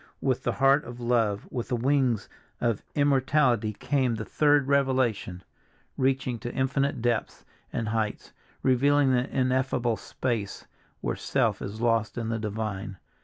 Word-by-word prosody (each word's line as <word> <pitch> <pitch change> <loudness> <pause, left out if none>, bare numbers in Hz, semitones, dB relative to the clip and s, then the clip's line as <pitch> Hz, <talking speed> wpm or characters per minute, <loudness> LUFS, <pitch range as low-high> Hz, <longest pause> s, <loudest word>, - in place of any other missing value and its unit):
With 130 -3 0
the - - -1
heart 135 +2 +4
of 120 0 -9
love, 115 -4 0
with 120 -2 -3
the 125 - 0
wings 130 -2 +1 0.3
of 115 -4 0
immortality 135 -5 +2
came 130 +1 0
the 110 -1 -5
third 145 -2 +3
revelation, 130 -9 +1 0.5
reaching 130 -2 0
to 120 - -5
infinite 135 -1 0
depths 120 -1 -1 0.3
and 110 - -2
heights, 110 -1 -2 0.3
revealing 135 +2 +4
the 125 +1 +1
ineffable 130 -3 0
space 115 -6 -3 0.4
where - - -1
self - - 0
is 105 +3 -6
lost 115 -2 +1
in 115 -2 -2
the 115 0 -1
divine. 105 -2 -4
125 Hz, 140 wpm, -27 LUFS, 110-135 Hz, 0.5 s, heart